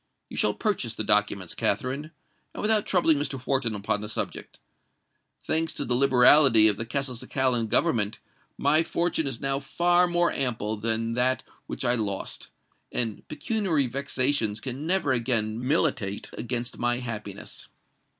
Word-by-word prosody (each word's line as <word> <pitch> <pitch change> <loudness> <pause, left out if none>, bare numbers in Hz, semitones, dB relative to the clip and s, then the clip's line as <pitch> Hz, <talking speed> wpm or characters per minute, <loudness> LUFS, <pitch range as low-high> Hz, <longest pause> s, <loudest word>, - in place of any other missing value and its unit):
You - - -9
shall - - +1
purchase 165 - -1
the - - -2
documents, 105 -3 0
Katherine—and 145 +5 -4
without 215 0 +1
troubling 165 -5 +3
Mr. 145 -2 -3
Wharton 130 -5 0
upon 100 0 -2
the 105 - -6
subject. 110 - -4 0.9
Thanks 160 0 0
to - - -2
the 125 - 0
liberality 125 -2 +6
of 105 -2 +3
the 115 - -4
Castelcicalan 125 -1 -1
government, 110 -10 +2 0.4
my 150 +3 +3
fortune 165 -2 -1
is 125 -4 -3
now 135 0 0
far 175 +5 +2
more 175 0 +1
ample 115 -5 0
than 115 +1 0
that 125 +2 +1 0.2
which - - -4
I 120 - +3
lost; 105 -5 -3 0.4
and 115 -4 -1
pecuniary 160 - -1
vexations 130 -4 0
can 135 +5 -5
never 180 -7 +1
again 115 -2 0
militate 130 -10 0
against 120 0 -4
my 120 0 0
happiness. 105 -5 -7
125 Hz, 140 wpm, -26 LUFS, 115-145 Hz, 0.9 s, liberality